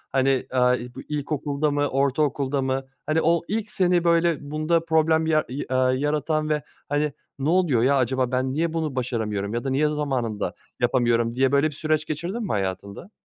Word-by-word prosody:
Ηani, 135 Hz, 0 st, +2 dB
ııı, 125 Hz, -1 st, +3 dB
i 125 Hz, 0 st, -9 dB
bu -, -, -7 dB
ilkokulda 145 Hz, 0 st, -1 dB
mı 145 Hz, 0 st, +1 dB
ortaokulda 140 Hz, 0 st, 0 dB
mı? 130 Hz, 0 st, -1 dB, 0.2 s
Ηani 160 Hz, +1 st, +2 dB
o 170 Hz, +1 st, +3 dB
ilk 215 Hz, +1 st, -2 dB
seni, 180 Hz, -2 st, +2 dB
böyle, 170 Hz, -2 st, +3 dB
bunda 160 Hz, +2 st, +1 dB
problem 160 Hz, 0 st, +3 dB
ya 155 Hz, -1 st, +2 dB
i 130 Hz, +3 st, -4 dB
aaa, 130 Hz, 0 st, +2 dB
yaratan 150 Hz, +3 st, 0 dB
ve, 150 Hz, -2 st, 0 dB, 0.3 s
hani, 145 Hz, 0 st, 0 dB, 0.3 s
"Ne 140 Hz, +3 st, 0 dB
oluyor 165 Hz, -10 st, +3 dB
ya? 140 Hz, +2 st, +4 dB
Αcaba 130 Hz, 0 st, 0 dB
ben 130 Hz, +1 st, 0 dB
niye 160 Hz, +2 st, 0 dB
bunu 160 Hz, -4 st, -2 dB
başaramıyorum? 110 Hz, -5 st, -2 dB
Ya 120 Hz, -, -2 dB
da 135 Hz, -, -2 dB
niye 140 Hz, +3 st, +2 dB
zamanında 135 Hz, -8 st, -2 dB, 0.3 s
yapamıyorum?" 120 Hz, -2 st, +2 dB
diye 130 Hz, 0 st, +2 dB
böyle 140 Hz, +2 st, +3 dB
bir 155 Hz, -, -6 dB
süreç 155 Hz, 0 st, 0 dB
geçirdin 170 Hz, +10 st, -4 dB
mi -, -, -3 dB
hayatında? 100 Hz, -, -4 dB
145 Hz, 185 wpm, -24 LUFS, 130-155 Hz, 0.3 s, ya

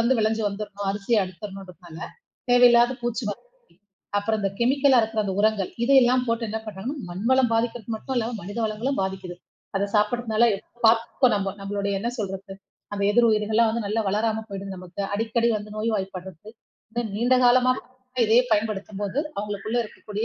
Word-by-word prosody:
வந்து 235 Hz, +2 st, +3 dB
விளைஞ்சு 220 Hz, 0 st, +1 dB
வந்துர்ணும். 205 Hz, 0 st, -6 dB
அரிசி 205 Hz, +3 st, 0 dB
அறுத்துறணுன்டு 190 Hz, 0 st, -8 dB
இருப்பாங்க. 170 Hz, -2 st, -13 dB, 0.5 s
தேவை 245 Hz, 0 st, +8 dB
இல்லாத 240 Hz, +1 st, +4 dB
பூச்சி 240 Hz, +1 st, -1 dB
மருந்து, -, -, -10 dB, 0.4 s
அப்புறம் 220 Hz, +1 st, -1 dB
அந்தக் 195 Hz, 0 st, -3 dB
கெமிக்கலா 270 Hz, 0 st, +4 dB
இருக்கிற 220 Hz, -1 st, -1 dB
அந்த 190 Hz, -1 st, -2 dB
உரங்கள். 215 Hz, -3 st, +1 dB
இதை 275 Hz, +2 st, +5 dB
எல்லாம் 250 Hz, +1 st, +3 dB
போட்டு 230 Hz, 0 st, 0 dB
என்ன 220 Hz, +1 st, -3 dB
பண்றாங்கன்னா, 215 Hz, +8 st, -5 dB
மண் 190 Hz, +5 st, -6 dB
வளம் 260 Hz, -3 st, +4 dB
பாதிக்கிறது 230 Hz, -1 st, -1 dB
மட்டுமில்லாம 240 Hz, -1 st, -2 dB
மனித 205 Hz, +5 st, -6 dB
வளங்களும் 225 Hz, +5 st, -2 dB
பாதிக்குது. 190 Hz, -2 st, -4 dB, 0.4 s
அதச் 200 Hz, +2 st, -2 dB
சாப்பிடுறதுனால 220 Hz, +1 st, +2 dB, 0.4 s
பாத்துப்போம் 230 Hz, +2 st, +3 dB
நம்ம 195 Hz, -1 st, -2 dB
நம்மளோடய 200 Hz, 0 st, -2 dB
என்ன 235 Hz, -, 0 dB
சொல்றது? 195 Hz, -2 st, -5 dB, 0.4 s
அந்த 200 Hz, 0 st, -1 dB
எதிர் 235 Hz, +2 st, +4 dB
உயிர்கள் 215 Hz, -1 st, +1 dB
எல்லாம் 230 Hz, +1 st, +4 dB
வந்து 230 Hz, +1 st, -1 dB
நல்லா 215 Hz, +3 st, 0 dB
வளராம 220 Hz, +2 st, 0 dB
போயிடும் 195 Hz, 0 st, -6 dB
நமக்கு, 180 Hz, +1 st, -9 dB
அடிக்கடி 225 Hz, +2 st, +1 dB
வந்து 210 Hz, 0 st, -7 dB
நோய்வாய்ப்படுறது. 195 Hz, -3 st, -4 dB, 0.7 s
நீண்ட 240 Hz, +5 st, +2 dB
காலமா 250 Hz, +1 st, +5 dB, 0.5 s
இதையே 225 Hz, +3 st, +5 dB
பயன்படுத்தும்போது 210 Hz, +1 st, -1 dB, 0.2 s
அவுங்களுக்குள்ள 210 Hz, +3 st, -3 dB
இருக்கக்கூடிய 215 Hz, 0 st, -6 dB
215 Hz, 155 wpm, -24 LUFS, 200-235 Hz, 0.7 s, தேவை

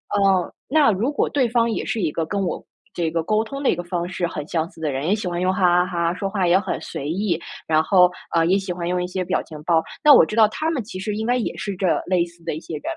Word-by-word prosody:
呃， 195 Hz, -3 st, +2 dB, 0.2 s
那 290 Hz, -3 st, +4 dB
如 220 Hz, +8 st, 0 dB
果 -, -, 0 dB
对 260 Hz, -5 st, +1 dB
方 235 Hz, 0 st, +2 dB
也 -, -, -2 dB
是 230 Hz, -, -2 dB
一 160 Hz, -4 st, 0 dB
个 165 Hz, -, -2 dB
跟 200 Hz, +5 st, -3 dB
我 185 Hz, -, -3 dB, 0.3 s
这 170 Hz, -2 st, -1 dB
个 165 Hz, -1 st, -1 dB
沟 215 Hz, +4 st, +1 dB
通 275 Hz, +5 st, -7 dB
的 -, -, +4 dB
一 -, -, 0 dB
个 175 Hz, -, -5 dB
方 175 Hz, 0 st, -3 dB
式 180 Hz, -1 st, -2 dB
很 150 Hz, -2 st, -6 dB
相 165 Hz, -1 st, -1 dB
似 175 Hz, -, -18 dB
的 155 Hz, -2 st, -1 dB
人， 135 Hz, +3 st, -3 dB
也 205 Hz, -, +3 dB
喜 210 Hz, -3 st, -4 dB
欢 175 Hz, 0 st, -2 dB
用 185 Hz, -, +1 dB
“哈 180 Hz, -1 st, +3 dB
哈 -, -, -7 dB
哈”， 170 Hz, -2 st, 0 dB
说 195 Hz, +1 st, -3 dB
话 195 Hz, -2 st, 0 dB
也 180 Hz, +2 st, +5 dB
很 195 Hz, -, -3 dB
随 140 Hz, +2 st, -5 dB
意， 180 Hz, -1 st, -1 dB, 0.3 s
然 155 Hz, -1 st, +3 dB
后， 180 Hz, 0 st, +5 dB, 0.2 s
呃 165 Hz, 0 st, +4 dB
也， 190 Hz, +3 st, +3 dB
喜 190 Hz, -2 st, -5 dB
欢 175 Hz, -1 st, -4 dB
用 180 Hz, 0 st, 0 dB
一 -, -, -3 dB
些 185 Hz, 0 st, -3 dB
表 -, -, 0 dB
情 155 Hz, -2 st, -10 dB
包， 165 Hz, 0 st, +3 dB, 0.2 s
那 300 Hz, -1 st, +9 dB
我 -, -, +8 dB
知 215 Hz, -, -5 dB
道 220 Hz, -2 st, +6 dB
他 315 Hz, +7 st, -2 dB
们 265 Hz, -8 st, -2 dB
其 185 Hz, -3 st, -8 dB
实 205 Hz, +2 st, -3 dB
应 220 Hz, +1 st, -3 dB
该 245 Hz, +2 st, +2 dB
也 235 Hz, -, -3 dB
是 200 Hz, 0 st, -4 dB
这 185 Hz, 0 st, -1 dB, 0.2 s
类 180 Hz, -2 st, +2 dB
似 170 Hz, 0 st, -18 dB
的 -, -, -3 dB
一 155 Hz, -, -5 dB
些 165 Hz, -, -7 dB
人。 150 Hz, -, -8 dB
180 Hz, 325 characters per minute, -22 LUFS, 170-210 Hz, 0.3 s, 那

